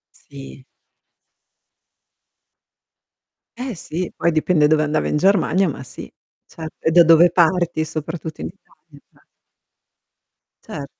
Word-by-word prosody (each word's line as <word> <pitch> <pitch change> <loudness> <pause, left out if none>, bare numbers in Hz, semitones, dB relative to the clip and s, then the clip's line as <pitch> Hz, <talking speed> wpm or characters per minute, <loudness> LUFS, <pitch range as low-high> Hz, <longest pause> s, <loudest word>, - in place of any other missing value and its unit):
Sì. 65 -1 -13 2.9
Eh, 250 -4 -5
sì. 170 +2 -5
Poi 170 - 0
dipende 155 -1 +2
dove 155 0 +2
andava 155 0 -1
in - - 0
Germania, 190 +1 +2
ma 135 - -7
sì. 130 - -11 0.3
Ce 160 -1 -9
e 160 - 0
da 175 +1 +7
dove 165 +1 +5
parti 170 -1 +1
soprattutto 160 - -6
in 80 - -4
Italia. - - -20 1.4
Ce 140 - -6
160 Hz, 110 wpm, -20 LUFS, 150-175 Hz, 2.9 s, da